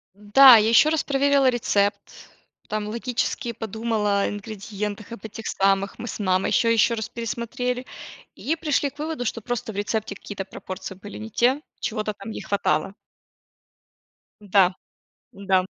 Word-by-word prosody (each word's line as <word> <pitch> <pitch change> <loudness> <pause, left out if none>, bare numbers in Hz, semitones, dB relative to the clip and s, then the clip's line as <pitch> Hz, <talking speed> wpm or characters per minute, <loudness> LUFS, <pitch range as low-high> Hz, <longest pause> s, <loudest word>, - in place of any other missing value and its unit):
Да, 235 +5 +8
я 215 +1 +3
ещё 265 +7 +6
раз 320 - +1
проверила 280 -1 +3
рецепт. 205 -4 +1 0.7
Там 215 0 -2
логически 240 +2 -2
подумала 220 -2 -1
ингредиентах, 205 +1 -6
об 230 -2 -9
этих 220 +1 -7
самых, 195 0 +1
мы 240 - -5
с - - -6
мамой 185 -2 +1
ещё-ещё 230 0 +3
раз 220 -2 -4
пересмотрели 240 +2 -3 0.5
и 320 - -1
пришли 300 -3 0
к - - -26
выводу, 305 -4 -3
что 230 0 -2
просто 230 -1 -4
в - - -14
рецепте 205 +1 -2
какие-то 200 -1 -7
пропорции 190 0 -8
были 205 +2 -10
не 220 +1 -7
те, 250 +5 +2 0.2
чего-то 215 -1 -2
там 200 +1 -10
не - - -6
хватало. 200 -1 0 1.5
Да. 195 -2 +3 0.6
Да. 190 -2 +1
220 Hz, 145 wpm, -24 LUFS, 200-245 Hz, 1.5 s, Да